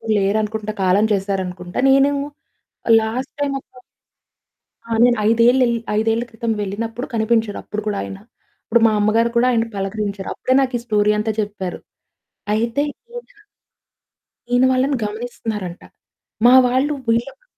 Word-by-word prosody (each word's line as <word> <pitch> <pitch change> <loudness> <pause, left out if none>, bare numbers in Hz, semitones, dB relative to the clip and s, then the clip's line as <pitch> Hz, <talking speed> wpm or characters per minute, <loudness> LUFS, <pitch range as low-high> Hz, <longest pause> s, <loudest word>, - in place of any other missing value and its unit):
లేరనుకుంటా. 210 +2 0
కాలం 190 +3 +3
చేశారనుకుంటా. 190 -2 -3
నేను 275 +1 +4 0.9
last 230 +5 -3
time 285 -1 0
ఒక - - -24 1.2
ఆ! - - -15
నేను 245 -1 +4
ఐదేల్లెల్ 235 +1 +4 0.2
5ఏళ్ల 225 +1 +1
క్రితం 230 0 -3
వెళ్ళినప్పుడు 225 +5 -4
కనిపించరు, 220 -1 +1
అప్పుడు 210 - -5
కూడా 205 -1 -1
ఆయన. 195 - -7 0.5
ఇప్పుడు 235 +1 +2
మా - - +2
అమ్మగారు 220 +3 +2
కూడా 245 +2 +4
ఆయన్ని 230 -1 0
పలకరించారు. 200 0 -3
అప్పుడే 255 - 0
నాకు 260 -2 -1
ఈ - - -11
స్టోరీ 210 -2 +2
అంతా 220 +1 -1
చెప్పారు. 200 -3 -5 0.8
అయితే 230 +5 0 0.3
ఈయన... 485 0 -8 1.3
ఈయన 245 +1 +4
వాళ్లని 260 +2 +1
గమనిస్తున్నారంట. 210 -4 -5 0.6
మా 245 - +8
వాళ్లు 260 +4 +1
వీళ్లకు 235 - -1
225 Hz, 125 wpm, -20 LUFS, 205-245 Hz, 1.3 s, మా